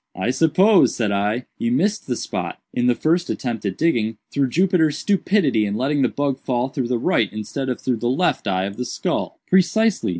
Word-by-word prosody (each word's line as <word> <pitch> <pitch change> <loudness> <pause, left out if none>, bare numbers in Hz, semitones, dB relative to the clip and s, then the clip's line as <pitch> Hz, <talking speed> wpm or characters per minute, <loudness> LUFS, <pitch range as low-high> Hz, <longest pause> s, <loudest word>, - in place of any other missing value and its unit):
"I 120 - -1
suppose," 185 +8 +4
said 110 -4 0
I, 105 +5 -1
"you 115 - 0
missed 200 - 0
the 125 - -1
spot, - - -4 0.2
in 120 0 +1
the 125 - +3
first 170 +6 0
attempt 120 -5 -3
at 95 - -4
digging, 115 -9 0
through 140 -2 0
Jupiter's 165 -1 +2
stupidity 180 - +1
in 100 -1 -2
letting 140 +5 0
the - - +3
bug 140 -2 -2
fall 125 -1 -1
through 130 -2 -3
the 125 0 0
right 115 -1 +1
instead 120 +6 -4
of 125 - -2
through 125 -2 -1
the 120 +2 -1
left 150 +8 0
eye 95 0 0
of 100 0 -6
the 125 - -3
skull." - - -3
"Precisely. 190 - +2
130 Hz, 205 wpm, -21 LUFS, 115-165 Hz, 0.2 s, suppose